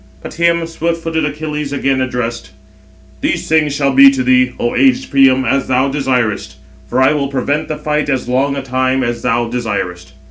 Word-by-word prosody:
But - - -8
him 170 0 +1
swift 165 0 -3
footed 160 -1 -1
Achilles 150 -1 -4
again 135 -1 0
addressed: 120 -2 -3 0.7
"These - - -1
things 155 -2 +2
shall 140 -1 +1
be 135 +1 +8
to 135 -1 -1
thee, 125 0 +3
O 120 - -1
aged 265 0 +2
Priam, 135 -2 +4
as 135 +3 0
thou 130 +1 +1
desirest; 125 - -1 0.3
for 125 - -1
I 130 +3 +4
will 140 -2 -1
prevent 140 +3 -2
the 155 - -4
fight 150 0 -2
as 130 -3 -1
long 135 +3 0
a 140 - -4
time 130 0 0
as 120 -1 -3
thou 120 -1 0
desirest." 100 - -4
135 Hz, 185 wpm, -15 LUFS, 125-150 Hz, 0.7 s, be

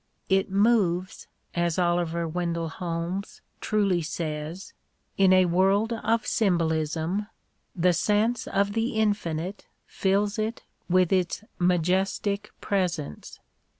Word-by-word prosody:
" - - -41
It 190 - -5
moves," 195 -3 +1 0.3
as 170 -1 0
Oliver 175 -1 +1
Wendell 170 0 -2
Holmes 175 +3 -4 0.2
truly 200 -5 +1
says, 160 +1 -5 0.2
" - - -47 0.2
in 190 -1 +6
a 185 0 +6
world 195 +6 +2
of 225 0 0
symbolism, 165 0 0 0.5
the 180 0 +3
sense 210 +7 +1
of 200 +1 +1
the 225 +2 -1
infinite 195 -3 -1 0.2
fills 200 +2 0
it 220 +2 -2 0.3
with 185 0 +3
its 185 +2 0 0.2
majestic 190 +4 +1
presence." 175 - -2
185 Hz, 115 wpm, -26 LUFS, 170-205 Hz, 0.5 s, in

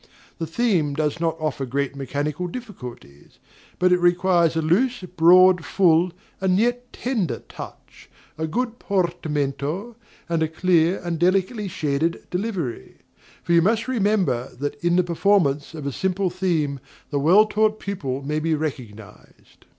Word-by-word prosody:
The 165 - -3
theme 165 -6 +1
does 155 +1 -1
not 165 -1 0
offer 155 -3 -2
great 140 +2 -2
mechanical 145 +5 -3
difficulties; 125 - -10 0.4
but 180 0 +3
it 180 - +3
requires 175 -1 +3
a 160 - +1
loose, 240 +10 +1
broad, 180 +1 +5
full, 175 +1 +3 0.3
and 185 -1 +2
yet 245 +3 0
tender 205 - -2
touch, - - -11 0.3
a 160 +1 -3
good 240 +7 -2
portamento, 170 - -2 0.3
and 165 -1 0
a 160 - +2
clear 170 +2 +2
and 170 -2 -3
delicately 195 +4 +1
shaded 160 -1 -1
delivery; 180 - -4 0.5
for 170 - 0
you 170 - +6
must 225 +6 +1
remember 195 - +1
that 145 +3 -5
"in 175 0 +3
the 180 - +4
performance 170 -4 +1
of 150 -3 -7
a 140 - -1
simple 190 +4 -1
theme 165 -7 -1 0.3
the 145 - 0
well 180 +9 +6
taught 215 0 +1
pupil 140 -9 -4
may 150 +2 -1
be 160 0 0
recognized." 125 -9 -8
170 Hz, 145 wpm, -23 LUFS, 150-190 Hz, 0.5 s, you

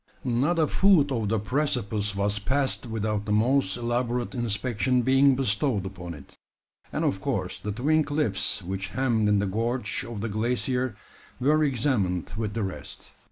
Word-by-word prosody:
Not 130 +7 +1
a 160 - +4
foot 165 -4 +4
of 115 -5 -1
the 110 - +2
precipice 110 -4 -1
was 100 +1 0
passed 130 +3 0
without 105 -2 -2
the 105 - -3
most 115 0 +2
elaborate 120 0 -1
inspection 120 +1 0
being 135 +2 +5
bestowed 115 -3 0
upon 90 -3 -7
it; 70 -2 -15 0.5
and - - -1
of - - 0
course - - -2
the 105 - -4
twin 150 +9 +2
cliffs 125 -11 -1
which 95 +1 -4
hemmed 115 -5 +2
in 105 - +4
the 100 - +1
gorge 115 +7 -1
of 115 -5 -6
the 115 - -2
glacier 125 +3 -1 0.4
were 150 +4 +3
examined 115 - 0
with 105 -1 -3
the 115 - -1
rest. 95 -1 -7
120 Hz, 160 wpm, -26 LUFS, 105-130 Hz, 0.5 s, being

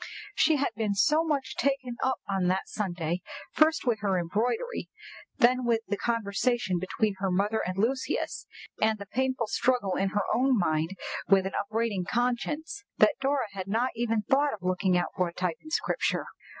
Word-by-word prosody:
She 320 - +4
had 285 -1 0
been 215 -2 -1
so 305 +10 +4
much 290 -5 -1
taken 270 -3 0
up 260 -2 0
on 195 -2 0
that 185 +1 0
Sunday, 175 -4 -2 0.3
first 315 0 +3
with 235 -4 +1
her 195 -2 +1
embroidery, 235 - -1 0.5
then 250 +2 +4
with 230 -2 +2
the 205 - 0
conversation 230 -2 0
between 205 +3 0
her 195 0 0
mother 205 +4 +1
and 185 +1 -3
Lucius, 255 +6 -1 0.3
and 220 0 +3
the 200 - -8
painful 260 +3 -1
struggle 230 -3 +1
in 195 - +1
her 205 +1 0
own 260 0 +3
mind 160 0 0 0.3
with 195 -1 +5
an 190 - -3
upbraiding 215 -2 -1
conscience, 245 +3 -1
that 215 - +4
Dora 275 -2 +1
had 190 -1 -6
not 230 +6 +1
even 225 -2 0
thought 280 +4 +2
of 200 - -19
looking 185 0 +2
out 175 - -1
for 180 -2 +1
a 170 - -8
type 180 -3 -1
in 315 - -11
Scripture. - - 0
220 Hz, 175 wpm, -28 LUFS, 190-255 Hz, 0.5 s, with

